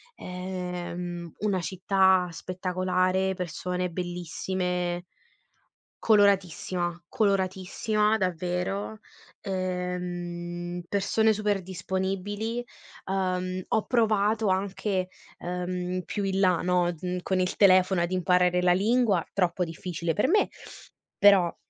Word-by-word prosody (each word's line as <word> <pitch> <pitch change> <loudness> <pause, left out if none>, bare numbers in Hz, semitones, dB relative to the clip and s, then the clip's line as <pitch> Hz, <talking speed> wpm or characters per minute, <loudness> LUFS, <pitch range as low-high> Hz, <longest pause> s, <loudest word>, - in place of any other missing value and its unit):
Ehm, 180 -2 -5
una 200 -2 0
città 190 +1 +3
spettacolare, 185 +1 0
persone 180 0 -3
bellissime. 180 0 -3 1.0
Coloratissima, 185 -4 +2
coloratissima 210 0 +1
davvero, 180 +3 -2 0.4
ehm, 175 -2 -4
persone 220 +2 +2
super 210 -2 0
disponibili. 195 +5 -3 0.4
Uhm, 185 -1 -1
ho 220 - +1
provato 220 -2 +2
anche, 190 0 -1 0.3
ehm, 180 +1 -3
più 205 +2 -3
in 195 0 0
là, 185 -3 +3
no, 180 -1 +2
mhmm, 180 +1 -3
con 190 0 0
il 185 0 0
telefono 185 -2 +5
ad 175 - -1
imparare 180 -1 +3
la 180 - +5
lingua- 210 -2 +2
troppo 180 -2 +1
difficile 170 0 -3
per 210 - +2
me- 415 +7 +3 0.7
però 195 -4 +6
185 Hz, 95 wpm, -27 LUFS, 180-195 Hz, 1.0 s, però